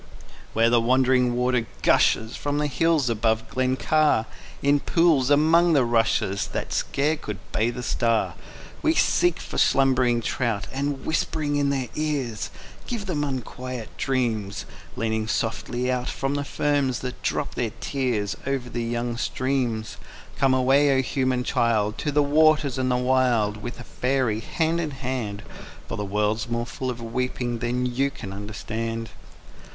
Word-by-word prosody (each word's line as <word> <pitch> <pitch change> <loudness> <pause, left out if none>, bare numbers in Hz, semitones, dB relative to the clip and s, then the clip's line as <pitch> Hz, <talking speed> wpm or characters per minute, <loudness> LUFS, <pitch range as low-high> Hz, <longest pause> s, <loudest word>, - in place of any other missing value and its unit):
_ - - -23 0.5
Where 115 +1 +3
the 120 -1 +4
wandering 125 0 +3
water 125 -1 +1 0.2
gushes 110 0 +3
From 145 0 -2
the 150 - +1
hills 155 0 +2
above 110 -1 +1
Glen 130 0 0
Car, 150 -5 +2 0.4
In 145 +1 +4
pools 160 -5 +3
among 160 +4 +5
the 135 -5 +4
rushes 115 -4 +1
That - - -4
scarce 150 +2 0
could 105 -2 -5
bathe 115 +3 0
a 125 - -4
star, 115 -1 +1 0.5
We 320 0 +2
seek 175 - +3
for - - -4
slumbering 130 -3 +3
trout, 115 -5 -1
And 140 0 -2
whispering 155 -2 -1
in 145 -1 +2
their 135 -3 -1
ears 140 -8 -2 0.4
Give 230 -4 -3
them 160 -6 -1
unquiet 130 -3 -5
dreams; 115 -7 -1 0.3
Leaning 110 -1 -1
softly 120 +3 -1
out 125 0 -1
From 140 +1 -2
ferns 140 -3 0
that 125 -1 -6
drop - - -1
their 115 -3 -2
tears 120 -7 -1
Over 130 -3 -2
the 120 - -2
young 120 0 -2
streams. 125 -4 -1 0.4
_Come 135 -1 +4
away, 135 +2 +4
O 130 - +2
human 130 -1 0
child! 115 -4 +1
To 150 - -1
the 145 +1 +3
waters 150 -2 +3
and 130 0 +1
the 125 - +2
wild 125 -4 +2
With 120 +3 -7
a - - -7
faery, 125 -3 0
hand 165 +7 0
in 160 - -2
hand, 125 -7 -4 0.4
For - - -4
the 105 - -3
world's 105 +3 0
more 120 0 -1
full 130 +2 -4
of 120 -1 -5
weeping 120 0 -2
than 125 +2 -1
you 130 +3 +1
can 100 -8 -8
understand. 110 +2 -4
125 Hz, 155 wpm, -24 LUFS, 115-140 Hz, 0.5 s, among